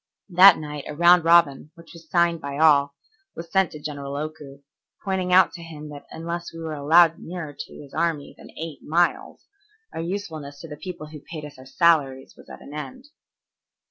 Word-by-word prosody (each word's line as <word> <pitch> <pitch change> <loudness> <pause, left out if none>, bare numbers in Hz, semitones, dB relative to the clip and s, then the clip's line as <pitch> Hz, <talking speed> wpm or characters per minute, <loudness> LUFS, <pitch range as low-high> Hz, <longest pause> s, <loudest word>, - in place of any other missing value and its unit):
That 185 +2 +8
night 150 -2 -7
a 150 - -6
round 175 +1 +6
robin, 165 -4 +4
which 170 0 -15
was 165 -2 -15
signed 170 -1 +2
by 140 0 -5
all, 145 -2 +4 0.4
was 165 0 -9
sent 190 -3 +3
to 150 - -8
General 140 -2 -6
Oku, 145 -2 -7 0.4
pointing 190 -2 -1
out 185 +1 +5
to 170 - -9
him 155 -2 -10
that 145 -1 -11
unless 170 +1 -6
we 165 - -11
were 160 -1 -5
allowed 160 +3 +4
nearer 165 -4 -7
to - - -9
his 140 -2 -13
army 160 -3 -2
than - - -15
eight 160 -3 -7
miles, 170 +3 -1 0.5
our - - -4
usefulness 160 -6 -6
to 165 - -9
the 150 - -8
people 170 -2 -8
who 155 -1 -10
paid 155 +1 -9
us 145 -2 -12
our 130 - -13
salaries 140 -5 +1
was - - -17
at - - -11
an 145 - -12
end. 255 - -8
160 Hz, 195 wpm, -23 LUFS, 145-170 Hz, 0.5 s, That